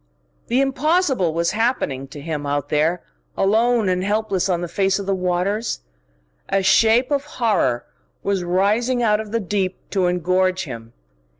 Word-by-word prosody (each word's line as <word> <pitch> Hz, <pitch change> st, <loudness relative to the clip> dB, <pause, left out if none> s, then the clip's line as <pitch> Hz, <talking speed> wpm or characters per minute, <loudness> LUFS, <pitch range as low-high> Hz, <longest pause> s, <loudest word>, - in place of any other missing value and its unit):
The 250 Hz, +3 st, +2 dB
impossible 275 Hz, -, +1 dB
was 170 Hz, +1 st, 0 dB
happening 210 Hz, -, -1 dB
to 145 Hz, -, -10 dB
him, 150 Hz, -1 st, -4 dB
out 145 Hz, 0 st, -2 dB
there, 160 Hz, +4 st, +1 dB, 0.3 s
alone 225 Hz, +2 st, +2 dB
and 185 Hz, 0 st, 0 dB
helpless 205 Hz, -2 st, 0 dB
on 175 Hz, -2 st, 0 dB
the 175 Hz, -, -3 dB
face 195 Hz, +2 st, +1 dB
of 200 Hz, -, -5 dB
the 195 Hz, -, 0 dB
waters. 185 Hz, -, -1 dB, 0.7 s
A 195 Hz, -, +1 dB
shape 225 Hz, +7 st, +4 dB
of 285 Hz, 0 st, 0 dB
horror 205 Hz, -, +1 dB, 0.4 s
was 195 Hz, -2 st, 0 dB
rising 215 Hz, +8 st, +1 dB
out 210 Hz, -2 st, +3 dB
of 215 Hz, -1 st, -6 dB
the 230 Hz, -, 0 dB
deep 190 Hz, -2 st, -2 dB
to 190 Hz, -3 st, +1 dB
engorge 185 Hz, +1 st, +1 dB
him. 115 Hz, -6 st, -9 dB
195 Hz, 160 wpm, -21 LUFS, 175-225 Hz, 0.7 s, shape